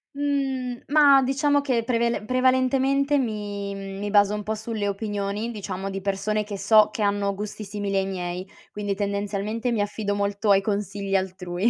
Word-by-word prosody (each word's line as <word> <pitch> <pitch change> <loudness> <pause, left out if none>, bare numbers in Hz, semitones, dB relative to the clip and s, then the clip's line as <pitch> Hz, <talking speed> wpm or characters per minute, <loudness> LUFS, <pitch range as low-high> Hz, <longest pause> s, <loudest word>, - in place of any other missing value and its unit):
Mhmm, 270 -3 -1
ma 285 -2 +6
diciamo 285 +2 +2
che 255 -5 0
prevele 235 -2 0
prevalentemente 260 +3 +2
mi 205 -5 -3
mi 195 +1 -5
baso 205 0 +4
un 210 - -4
po' 220 +1 -2
sulle 220 -1 -3
opinioni, 205 +2 -3
diciamo, 195 -3 -5
di 195 0 -4
persone 200 +2 -1
che 205 -1 -6
so 210 +2 +5
che 215 - -5
hanno 200 -1 +1
gusti 210 +2 -6
simili 200 0 -3
ai 195 0 +2
miei, 180 -1 -4 0.3
quindi 205 -1 -2
tendenzialmente 205 +3 -2
mi 230 - 0
affido 205 0 -2
molto 200 +1 -1
ai 195 0 +5
consigli 200 -1 -2
altrui, 185 +1 0
205 Hz, 165 wpm, -25 LUFS, 200-235 Hz, 0.3 s, ma